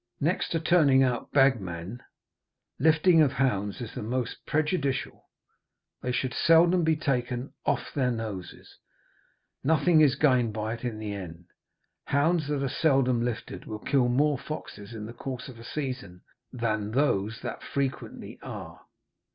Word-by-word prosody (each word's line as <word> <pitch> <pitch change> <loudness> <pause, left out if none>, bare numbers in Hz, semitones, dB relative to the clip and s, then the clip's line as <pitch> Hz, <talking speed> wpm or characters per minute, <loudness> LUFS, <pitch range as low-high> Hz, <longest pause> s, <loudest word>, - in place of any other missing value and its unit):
Next 165 +6 0
to 165 - 0
turning 150 -5 +4
out 125 -2 -1
bag 135 -5 +4
men, 90 +6 -6 0.8
lifting 160 +3 +5
of 140 -3 +3
hounds 105 -5 0
is 115 - -6
the - - -5
most 120 +3 -3
prejudicial. 150 -3 -1 0.8
They 125 - -2
should 125 0 -1
seldom 170 +4 +5
be 160 0 +3
taken 125 -4 -2
'off - - 0
their 130 -3 +1
noses,' 110 -6 -6 0.8
nothing 160 +2 +4
is 140 -3 +5
gained 125 -6 +3
by 110 +1 -2
it 120 - -8
in 120 -3 -3
the 105 -1 -4
end; 85 -3 -8 0.6
hounds 155 +2 +2
that 145 -2 -1
are - - +1
seldom 135 -5 +2
lifted 120 -2 -4
will 110 - -5
kill 130 +3 +2
more 140 +3 +2
foxes 115 -9 -7
in 105 -1 -6
the 115 - -8
course 125 +1 -6
of 125 -4 -11
a - - -10
season 125 -10 -5 0.3
than 110 -4 -1
those 115 -6 +1
that - - -5
frequently 140 -1 -4
are. - - -8
130 Hz, 150 wpm, -28 LUFS, 115-150 Hz, 0.8 s, lifting